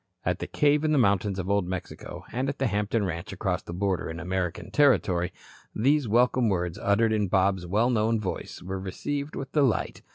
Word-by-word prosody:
At -, -, 0 dB
the -, -, -4 dB
cave 150 Hz, 0 st, +2 dB
in 155 Hz, -1 st, +2 dB
the -, -, +3 dB
mountains 100 Hz, -4 st, +2 dB
of 90 Hz, -1 st, -3 dB
Old 100 Hz, -2 st, +1 dB
Mexico 90 Hz, -1 st, -6 dB
and 130 Hz, +3 st, -1 dB
at 140 Hz, -, -4 dB
the 135 Hz, -, 0 dB
Hampton 105 Hz, -1 st, 0 dB
ranch 85 Hz, -2 st, -4 dB
across -, -, -2 dB
the -, -, -9 dB
border 90 Hz, -2 st, -1 dB
in 80 Hz, +1 st, -6 dB
American 90 Hz, -1 st, -3 dB
territory, 95 Hz, -11 st, +3 dB, 0.4 s
these 140 Hz, +4 st, +2 dB
welcome 120 Hz, +1 st, +3 dB
words 90 Hz, -3 st, -1 dB
uttered 110 Hz, +2 st, +3 dB
in 105 Hz, -2 st, +1 dB
Bob's 95 Hz, -1 st, +1 dB
well 110 Hz, +7 st, +2 dB
known 110 Hz, -1 st, +2 dB
voice 95 Hz, -3 st, -5 dB
were 95 Hz, +1 st, -4 dB
received 140 Hz, +10 st, -4 dB
with 135 Hz, -, -5 dB
delight. 140 Hz, -6 st, +1 dB
100 Hz, 195 wpm, -27 LUFS, 95-125 Hz, 0.4 s, the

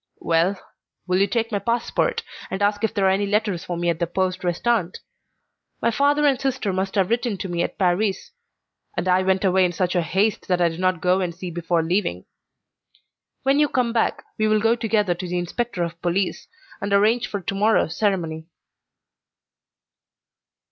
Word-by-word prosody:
"Well, 170 Hz, +4 st, +1 dB, 0.5 s
will 185 Hz, 0 st, +1 dB
you 200 Hz, -, +4 dB
take 230 Hz, 0 st, -1 dB
my 205 Hz, -, 0 dB
passport 235 Hz, -, 0 dB, 0.3 s
and 190 Hz, +1 st, -2 dB
ask 205 Hz, +1 st, +1 dB
if 220 Hz, -, +2 dB
there 200 Hz, -3 st, 0 dB
are 190 Hz, -, +5 dB
any 200 Hz, +1 st, +1 dB
letters 205 Hz, -3 st, 0 dB
for 175 Hz, -, -4 dB
me 175 Hz, 0 st, -1 dB
at 170 Hz, -2 st, 0 dB
the 170 Hz, -, 0 dB
poste 185 Hz, +1 st, -1 dB
restante? 180 Hz, +1 st, 0 dB, 0.8 s
My -, -, +1 dB
father 285 Hz, +4 st, +2 dB
and 275 Hz, -2 st, +2 dB
sister 260 Hz, -7 st, -1 dB
must 190 Hz, +1 st, -2 dB
have 195 Hz, 0 st, +1 dB
written 235 Hz, -3 st, 0 dB
to 190 Hz, -, -4 dB
me 175 Hz, -1 st, -2 dB
at -, -, -3 dB
Paris, 190 Hz, +2 st, 0 dB, 0.7 s
and -, -, -1 dB
I 185 Hz, 0 st, +4 dB
went 190 Hz, +1 st, +1 dB
away 190 Hz, 0 st, +4 dB
in 180 Hz, -, +2 dB
such 180 Hz, +1 st, 0 dB
haste 190 Hz, +4 st, 0 dB
that 180 Hz, -1 st, +1 dB
I 175 Hz, -1 st, +3 dB
did 165 Hz, +1 st, -8 dB
not 185 Hz, -2 st, +1 dB
go 180 Hz, +1 st, +3 dB
and 175 Hz, -3 st, -2 dB
see 180 Hz, 0 st, -6 dB
before 170 Hz, 0 st, 0 dB
leaving. 165 Hz, -, -1 dB, 1.2 s
When 275 Hz, +2 st, +3 dB
you 295 Hz, -1 st, +3 dB
come 245 Hz, -2 st, 0 dB
back 230 Hz, -, 0 dB, 0.2 s
we 215 Hz, -, +3 dB
will 215 Hz, 0 st, +3 dB
go 225 Hz, +2 st, +3 dB
together 215 Hz, -5 st, +1 dB
to 180 Hz, +1 st, -6 dB
the 180 Hz, +1 st, -2 dB
inspector 180 Hz, +2 st, -2 dB
of 170 Hz, 0 st, -6 dB
police, 180 Hz, -, -1 dB, 0.3 s
and 200 Hz, -, -3 dB
arrange 215 Hz, +4 st, +3 dB
for 205 Hz, -, -4 dB
to 195 Hz, -, -4 dB
morrow's 200 Hz, -5 st, +2 dB
ceremony." 165 Hz, -6 st, -1 dB
190 Hz, 190 wpm, -23 LUFS, 175-220 Hz, 1.2 s, are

